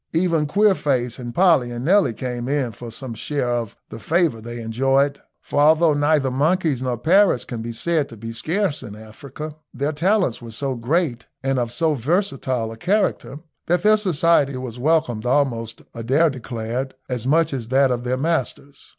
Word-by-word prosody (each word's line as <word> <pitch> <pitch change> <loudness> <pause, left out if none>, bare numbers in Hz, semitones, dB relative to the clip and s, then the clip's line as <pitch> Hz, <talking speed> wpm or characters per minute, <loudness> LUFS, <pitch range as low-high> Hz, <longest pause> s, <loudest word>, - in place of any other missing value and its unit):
Even 165 -2 +1
Queerface 145 - +1
and 120 -1 -7
Polly 165 -9 +4
and 120 +1 -5
Nelly 185 - +3
came 125 -1 -4
in 140 -4 0
for 120 +2 -9
some 115 +2 -6
share 125 +3 -2
of 120 -3 -3
the - - -8
favour 160 -5 +1
they 120 +1 -7
enjoyed, 135 +5 +1 0.2
for - - -2
although 155 +2 +5
neither 145 -2 +2
monkeys 150 0 +1
nor 125 -2 -1
parrots 180 - +3
can 115 -2 -5
be 115 +1 -5
said 155 +5 0
to 115 - -11
be 115 +2 -7
scarce 165 - -1
in 105 -5 -9
Africa, 140 +8 -9
their 140 +4 -2
talents 175 - +1
were 115 - -9
so 135 +4 -3
great 125 +1 -1 0.2
and 135 -1 +1
of 120 -1 -2
so 160 +5 +1
versatile 135 - -1
a 115 - -9
character, 180 - -1 0.3
that 175 +1 +1
their 215 +1 +6
society 165 -8 +2
was 125 -2 -6
welcomed 135 -6 +1
almost, 120 -4 0
Adair 135 +8 +2
declared, 125 +1 -5
as 125 -1 -3
much 160 +2 +3
as 120 -4 -4
that 135 +1 +3
of 120 -1 -2
their 125 +1 -1
masters. 140 -2 -3
135 Hz, 175 wpm, -22 LUFS, 120-160 Hz, 0.3 s, their